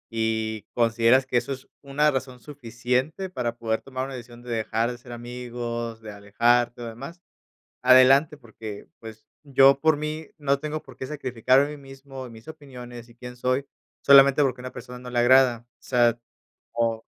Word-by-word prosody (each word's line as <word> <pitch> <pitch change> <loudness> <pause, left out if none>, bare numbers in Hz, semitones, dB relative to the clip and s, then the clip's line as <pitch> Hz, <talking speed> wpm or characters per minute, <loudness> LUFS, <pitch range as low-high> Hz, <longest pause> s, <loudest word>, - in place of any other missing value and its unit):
y, 110 -2 -2
consideras 115 +2 +3
que 130 -2 0
eso 135 - -1
es 130 - -11
una 145 +2 +1
razón 130 -2 -4
suficiente 130 +6 -3
para 120 -7 -3
poder 110 -1 -2
tomar 130 -1 -5
una 135 - -8
decisión 120 -1 -10
de 125 - -8
dejar 115 +1 -1
de 120 - -8
ser 120 0 -13
amigos, 120 -1 -6
de 110 -1 -9
alejarte 120 +4 +1
o - - -5
demás, 135 +9 -9 0.6
adelante, 130 +4 +6
porque, 110 -5 -10
pues, 110 -1 -12 0.2
yo 135 -1 +5
por 155 0 +3
mí 155 +1 -5
no 140 -1 +1
tengo 155 +1 -4
por - - -16
qué - - -5
sacrificarme 130 -1 +1
a - - -8
mí 150 - -8
mismo, 135 -1 -10
mis 115 0 -14
opiniones 125 -6 -11
y 120 - -19
quién 125 0 -10
soy, 130 +3 -1 0.3
solamente 140 +1 +7
porque 130 -3 0
a - - -12
una 130 - -6
persona 125 0 -10
no 125 0 -9
le 120 - 0
agrada. 120 -1 +4
O - - -37
sea, 120 -2 +2 0.5
o 115 -1 -1
125 Hz, 180 wpm, -25 LUFS, 115-135 Hz, 0.6 s, solamente